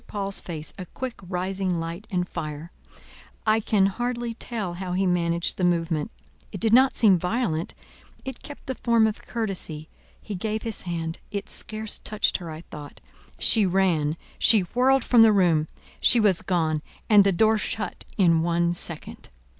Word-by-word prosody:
Paul's 200 -1 -3
face 160 -3 -6
a 185 - -6
quick 255 +4 -6
rising 185 0 -2
light 170 +5 -6
and 180 -2 -1
fire; 155 0 -6 0.7
I 215 0 +3
can 210 -2 +2
hardly 240 +3 -2
tell 220 -6 -4
how 180 0 -5
he 190 +2 +1
managed 170 -1 0
the 185 - -2
movement; 165 -3 0 0.4
it 195 - -6
did 225 +2 +2
not 260 +2 +5
seem 195 -6 +5
violent; 180 -3 -2 0.5
it 265 -2 -7
kept 290 - -11
the 260 - -3
form 235 -3 +2
of 220 0 -2
courtesy; 185 -9 -3 0.3
he 210 - -7
gave 215 +3 -3
his 225 -2 -3
hand; 165 -1 -3
it 200 -1 -5
scarce 215 -1 -3
touched 215 0 0
her 175 -3 -8
I 155 0 -7
thought; 145 -1 -9 0.4
she 220 - +4
ran, 170 -5 +1 0.2
she 220 -3 +6
whirled 255 +8 +2
from 240 -2 +5
the 225 -1 +7
room; 170 -6 +3 0.3
she 240 - +5
was 205 -5 +3
gone, 160 -4 0 0.3
and 205 -2 +7
the 195 - +3
door 220 +4 +3
shut, 215 0 -4
in 170 -5 +4
one 170 +1 +1
second. 170 -2 -5
190 Hz, 170 wpm, -25 LUFS, 170-220 Hz, 0.7 s, the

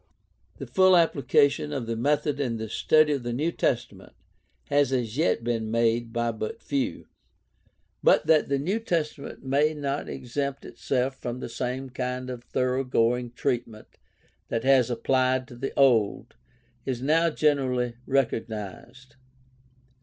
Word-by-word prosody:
The - - -6
full 185 -1 +5
application 150 -2 +2
of 135 -5 -3
the 115 0 -3
method 145 +4 0
in 120 -5 -1
the 110 -1 -5
study 155 +6 +3
of 140 - -2
the 120 0 -4
New 155 +7 0
Testa 120 -8 -1
ment 95 0 -16 0.6
has 145 -2 +3
as 120 -4 -1
yet 150 -6 +1
been 115 -2 -1
made 115 0 +1
by 120 0 0
but 110 -1 -5
few. 140 -2 -2 1.0
But - - +4
that 155 -3 +3
the 140 - +2
New 185 +11 -1
Testament 165 -9 -3
may 145 +4 +2
not 140 -1 -3
exempt 140 +2 -4
itself 130 0 -2
from 120 -1 -5
the - - -6
same 130 +2 -4
kind 125 0 -4
of 120 -1 -7
thoroughgoing 125 -2 0
treatment 115 -3 -4 0.5
that 115 - -2
has 130 -3 +4
been 120 -2 -3
applied 130 0 +1
to 120 - -10
the 135 +3 -4
Old 120 -7 +3 0.5
is 130 -3 -3
now 160 +6 +3
generally 130 -6 +1
recognized. 120 -1 -3
130 Hz, 145 wpm, -26 LUFS, 120-140 Hz, 1.0 s, full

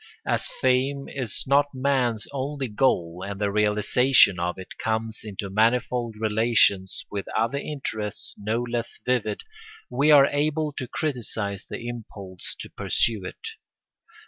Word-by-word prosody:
As - - +1
fame 135 +2 +1
is 130 -6 -1
not 140 +1 +3
man's 130 -4 +1
only 140 0 -3
goal 95 -7 0
and 100 0 -5
the 100 -1 0
realisation 105 0 +4
of 90 +1 -2
it 95 - -10
comes 110 0 -2
into 100 -2 -5
manifold 115 +2 +1
relations 110 -3 +2
with 100 -1 -4
other 115 +5 +1
interests 110 -9 -4
no 110 +4 -2
less 120 -1 -2
vivid, 115 -5 0 0.5
we 140 +5 +2
are 145 -2 +8
able 150 +2 0
to 130 -3 -6
criticise 110 -9 -3
the 120 - -6
impulse 100 -6 -6
to - - -8
pursue 110 -5 0
it. - - -8
115 Hz, 135 wpm, -25 LUFS, 105-135 Hz, 0.5 s, are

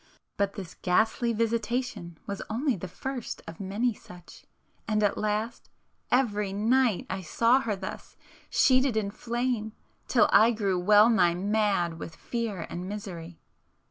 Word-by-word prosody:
But 200 0 0
this 190 -5 -8
ghastly 220 +6 +2
visitation 230 -5 -2
was 200 -1 -5
only 250 +5 0
the 185 0 -6
first 255 +6 -6
of 165 0 -10
many 205 +5 0
such,—and 210 +4 -7
at 205 - +2
last, 215 +2 -2 0.4
every 210 -6 +1
night 225 +2 +2
I 190 +1 -4
saw 230 +9 +3
her 225 -6 -2
thus, 190 0 -8 0.3
sheeted 255 -3 +3
in 200 -2 -1
flame, 235 -1 -2 0.3
till - - +4
I 230 +2 +6
grew 200 -4 0
well 210 +4 +6
nigh 180 -7 +3
mad 195 -4 0
with 160 - -8
fear 225 -8 -4
and 180 +2 -6
misery. 175 -5 -7
210 Hz, 140 wpm, -28 LUFS, 190-235 Hz, 0.4 s, I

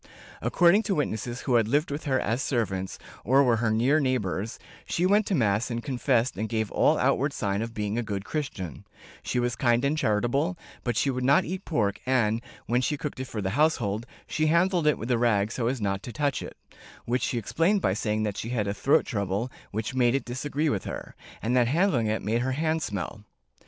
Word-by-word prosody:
According 175 +4 +4
to 195 - +2
witnesses 120 -4 -2
who 130 - -1
had 115 -3 +4
lived 145 +6 +1
with 145 +2 -4
her 130 -3 +2
as 115 +5 -1
servants, 95 -9 -1 0.3
or 135 +4 +5
were 120 -3 +3
her 110 0 +1
near 120 +8 +3
neighbors, 115 -6 -1 0.3
she 175 - 0
went 205 +2 +3
to 195 - +1
mass 110 -4 +1
and 120 -1 -3
confession 125 -3 0
and 110 0 -2
gave 110 -2 -1
all - - +3
outward - - +1
sign 100 0 -1
of 115 0 -5
being 105 +2 -1
a - - +1
good 100 -3 -4
Christian; 100 - -4 0.4
she 125 - -1
was 120 -1 0
kind 120 +2 +2
and 145 +2 +2
charitable, 135 - +1 0.3
but 120 -3 -1
she 140 - +2
would 125 0 -3
not 140 +3 +4
eat 185 +3 -5
pork 105 - 0
and, 115 -3 +2 0.2
when 120 +2 +1
she 150 +3 0
cooked 140 -1 -5
it 130 - -3
for 110 -5 -5
the 95 - -1
household, 120 -6 +1 0.2
she 155 0 0
handled 170 0 +3
it 150 - +4
with 115 +3 -4
a 120 - +2
rag 110 -3 +2
so 115 -1 -1
as 130 +1 -1
not 100 -2 -1
to 120 - -7
touch 140 +3 -1
it, - - -8 0.5
which 125 +1 0
she 120 - -1
explained 165 - +1
by 95 - +1
saying 105 +1 -1
that 105 -2 -2
she 115 - -4
had 110 -5 -1
a 100 - 0
throat 140 +9 +3
trouble 100 +3 -2 0.2
which 110 +3 -3
made 125 -1 +3
it 135 - -1
disagree 145 +5 -2
with 105 -10 -1
her, - - -6 0.3
and 120 +3 +1
that 125 -2 +4
handling 145 - +2
it 110 +1 -1
made 115 +3 0
her 130 +1 0
hands 160 +2 0
smell. 105 +1 -5
120 Hz, 220 wpm, -27 LUFS, 110-145 Hz, 0.5 s, or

